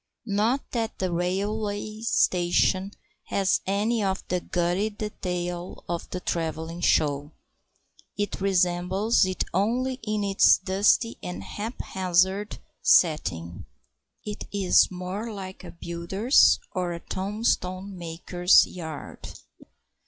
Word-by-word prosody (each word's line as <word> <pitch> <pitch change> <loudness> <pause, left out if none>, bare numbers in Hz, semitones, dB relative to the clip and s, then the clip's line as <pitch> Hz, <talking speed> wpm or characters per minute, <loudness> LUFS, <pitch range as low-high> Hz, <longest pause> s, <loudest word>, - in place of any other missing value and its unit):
Not 225 +5 +1
that 230 -2 -2
the 185 -1 -1
railway 205 +4 -2
station 185 -2 +2 0.3
has 195 -2 +1
any 210 +3 +1
of 190 -1 -2
the 180 - +1
gaudy 180 +5 0
detail 180 -4 -5
of 170 0 -4
the 180 - -4
travelling 165 -1 -3
show. 145 -2 +1 0.8
It 205 -1 -3
resembles 185 +3 +2
it 185 - -1
only 250 +7 0
in 215 -1 -2
its 200 -1 +5
dusty 200 +5 +2
and 90 +2 -6
haphazard 190 - -1 0.2
setting. 95 - +2 0.6
It 210 0 -6
is 195 -3 +4
more 185 +5 -5
like 190 -2 -8
a - - -9
builder's 170 +9 +3
or 180 -2 -2
a 170 - -6
tombstone 190 -1 -2
maker's 175 +1 +3
yard. 160 -4 -8
185 Hz, 110 wpm, -26 LUFS, 175-205 Hz, 0.8 s, its